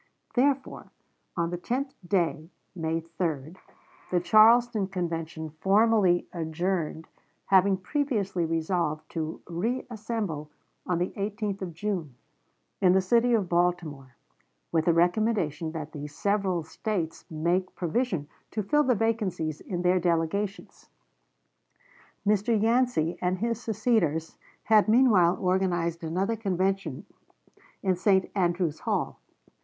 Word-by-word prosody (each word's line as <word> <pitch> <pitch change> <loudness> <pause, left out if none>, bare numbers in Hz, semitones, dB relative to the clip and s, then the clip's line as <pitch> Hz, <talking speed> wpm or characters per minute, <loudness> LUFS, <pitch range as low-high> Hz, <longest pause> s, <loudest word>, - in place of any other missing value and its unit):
Therefore, 270 +1 0 0.5
on 170 0 0
the 175 - -3
tenth 265 +8 -2
day 170 -3 0 0.3
(May 165 -1 -1
3), 165 -3 -3 0.6
the 180 - +2
Charleston 220 +2 +5
Convention 165 -4 -4
formally 200 -3 +3
adjourned, 165 -1 -2 0.4
having 195 0 +4
previously 200 - -1
resolved 165 -1 -1
to 160 -1 -4
reassemble 215 - -3 0.4
on 180 - +1
the 180 +2 -1
18th 205 0 -3
of 175 -4 -5
June, 175 -8 -3 0.7
in 180 -1 +5
the 190 - +5
city 235 +5 +3
of 205 -5 0
Baltimore, 170 -7 -1 0.6
with 160 0 +1
a - - +6
recommendation 175 -2 +1
that 155 -2 -5
the 145 -1 -6
several 190 +1 0
States 170 0 -3
make 170 +4 -1
provision 180 - -1 0.2
to 215 - -3
fill 295 +10 +3
the 255 -4 +2
vacancies 205 -9 -1
in 180 -2 -4
their 180 +1 +3
delegations. 175 +4 -2 1.4
Mr. 210 +2 +2
Yancey 225 -7 +1
and 180 +1 0
his 230 +3 -2
seceders 215 -9 0 0.2
had 215 -1 +4
meanwhile 215 -8 +5
organized 175 -3 0
another 185 +7 -1
convention 195 - -1 0.8
in 190 -2 +2
St. 190 +1 +2
Andrew's 175 -4 0
Hall. - - -2
185 Hz, 115 wpm, -27 LUFS, 165-215 Hz, 1.4 s, a